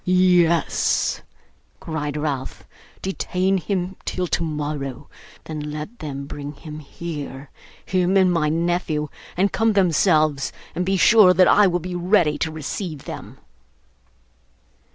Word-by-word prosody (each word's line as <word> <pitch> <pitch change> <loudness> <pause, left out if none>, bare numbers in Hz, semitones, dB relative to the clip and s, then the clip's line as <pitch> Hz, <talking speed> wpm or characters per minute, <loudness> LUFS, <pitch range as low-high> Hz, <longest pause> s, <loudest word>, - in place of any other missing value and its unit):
'Yes,' 180 -3 +2 0.6
cried 150 -2 -4
Ralph, 145 -3 -4 0.4
'detain 190 0 0
him 185 +2 -2
till 180 - -2
tomorrow; 150 -5 -3 0.4
then 155 -1 -6
let 150 +9 -6
them 140 -2 -5
bring 145 +1 -7
him 150 +1 -9
here 145 -3 -7 0.3
him 185 +1 +2
and 185 -2 +4
my 155 -3 +1
nephew 165 -2 -1 0.3
and 195 +2 +2
come 225 0 +2
themselves, 155 -6 +2 0.2
and 180 +2 -2
be 195 0 +2
sure 190 -2 +6
that 185 -1 +6
I 210 -1 +6
will 175 -1 +1
be 180 +2 -6
ready 175 -3 +2
to 160 - -1
receive 155 0 -5
them. - - -8
165 Hz, 125 wpm, -22 LUFS, 150-185 Hz, 0.6 s, sure